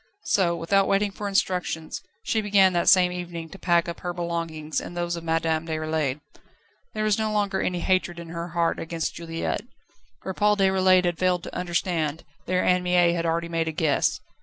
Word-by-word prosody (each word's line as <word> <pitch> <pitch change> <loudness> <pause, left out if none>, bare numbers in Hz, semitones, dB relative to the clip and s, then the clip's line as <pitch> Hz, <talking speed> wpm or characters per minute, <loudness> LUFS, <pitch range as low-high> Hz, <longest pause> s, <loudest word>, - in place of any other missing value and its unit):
So, 175 -4 +2
without 190 +4 +2
waiting 200 +1 +2
for 205 +1 -5
instructions, 180 -4 -1 0.2
she 220 - 0
began 200 -3 +4
that 175 -1 +3
same 180 -2 +6
evening 175 -2 -6
to 195 - -11
pack 170 -2 +2
up 170 - -5
her 175 -1 -4
belongings 165 -3 -3
and 175 - -8
those 175 0 -1
of 170 - -7
Madame 165 0 0
Déroulède. 155 -3 -1 0.7
There 215 - -1
was 215 0 +2
no 220 -1 0
longer 205 -2 0
any 180 -1 -1
hatred 185 -2 +1
in 170 -1 -8
her 170 +1 -5
heart 170 -1 0
against 165 0 -3
Juliette. 165 +2 -3 0.6
Where 190 - -4
Paul 210 +1 +2
Déroulède 190 -1 +4
had 175 -1 -1
failed 180 -2 +1
to - - -8
understand, 170 -3 -1 0.2
there 185 0 +1
Anne 180 0 +3
Mie 180 -1 +3
had 170 -1 -1
already 170 +1 0
made 165 -1 -1
a - - 0
guess. 155 -2 +1
175 Hz, 190 wpm, -25 LUFS, 165-185 Hz, 0.7 s, same